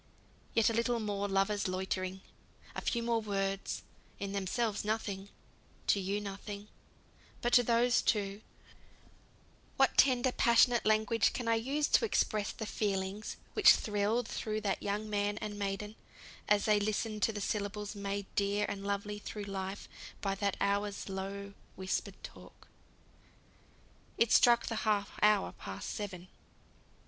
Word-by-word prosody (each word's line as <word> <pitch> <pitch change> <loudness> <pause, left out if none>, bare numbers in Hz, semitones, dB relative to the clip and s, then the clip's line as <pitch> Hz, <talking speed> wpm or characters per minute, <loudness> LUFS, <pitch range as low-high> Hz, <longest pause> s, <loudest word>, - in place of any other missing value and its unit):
Yet 225 - +4
a 230 - +2
little 235 +1 +1
more 205 -2 -2
lovers' 195 +1 +1
loitering; 185 0 -2 0.5
a - - -4
few 235 -1 -1
more 230 -1 +1
words, 195 -2 -2 0.3
in 200 0 -4
themselves 200 +2 -1
nothing 205 -2 -2 0.6
to 200 - +3
you 195 +2 -1
nothing, 200 +1 -7 0.7
but 240 - -1
to 245 - +8
those 240 +1 +3
two 200 -1 0 1.4
what - - +3
tender 255 -1 +5
passionate 235 -1 +4
language 215 0 +3
can 245 -2 -4
I 230 - +4
use 270 +6 0
to - - +4
express 215 - +1
the 220 - -6
feelings 200 -1 -2 0.2
which - - +8
thrilled 215 +3 0
through 215 -2 -3
that 200 -2 -1
young 205 +2 -2
man 205 0 0
and 210 -1 -5
maiden, 205 +2 -3 0.5
as 205 -1 +4
they 210 -1 +4
listened 215 +1 -1
to 225 - +3
the 210 - -5
syllables 205 0 -3
made 200 -1 -3
dear 205 +1 +1
and 195 -1 -4
lovely 200 +1 -2
through 210 0 -6
life 195 0 -5 0.3
by 195 -1 -1
that 200 0 -1
hour's 200 0 -1
low 200 +1 -5 0.2
whispered 190 0 -2
talk. - - -12 1.5
It 230 - +3
struck 240 -1 +6
the 225 - -2
half 205 -2 0
hour 210 -1 +4
past 95 -1 -7
seven. 185 -4 -5
205 Hz, 140 wpm, -33 LUFS, 200-220 Hz, 1.5 s, to